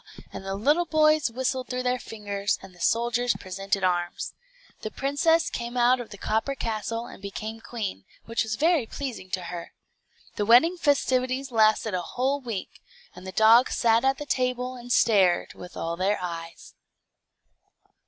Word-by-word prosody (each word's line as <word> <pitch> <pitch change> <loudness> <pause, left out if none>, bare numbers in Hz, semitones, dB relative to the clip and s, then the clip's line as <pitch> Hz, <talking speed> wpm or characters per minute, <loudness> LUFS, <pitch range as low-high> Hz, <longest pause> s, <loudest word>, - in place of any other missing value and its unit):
and - - -7
the 195 0 -3
little 295 - +2
boys 310 -3 +3
whistled 255 +1 -2
through 250 0 -2
their 250 0 0
fingers, 205 -3 -3
and 195 -1 -12
the 175 - -19
soldiers 240 +1 +1
presented 195 +1 -3
arms. 175 -1 -1 0.5
The 215 - -4
princess 285 +7 +1
came 240 +1 -4
out 245 +1 +4
of 240 - -7
the 205 - -10
copper 220 +8 -1
castle, 230 -1 -3
and - - -12
became 215 +3 -6
queen, 205 - -5 0.2
which 230 0 -1
was 220 -1 -1
very 315 -3 +2
pleasing 245 -10 -6
to 185 -1 -3
her. 170 -1 -7 0.6
The 205 - 0
wedding 255 +10 +6
festivities 265 -3 +1
lasted 220 -1 +3
a 180 - 0
whole 265 +9 -1
week, 230 -7 -6 0.3
and 180 +1 -10
the - - -5
dogs 225 +5 +5
sat 230 0 +3
at 270 0 +2
the 295 - -6
table, 255 -1 -1
and 245 0 -9
stared 195 -8 +3
with 180 - -11
all 165 +1 -2
their 190 +4 +1
eyes. 165 -2 -7
230 Hz, 165 wpm, -26 LUFS, 200-255 Hz, 0.6 s, wedding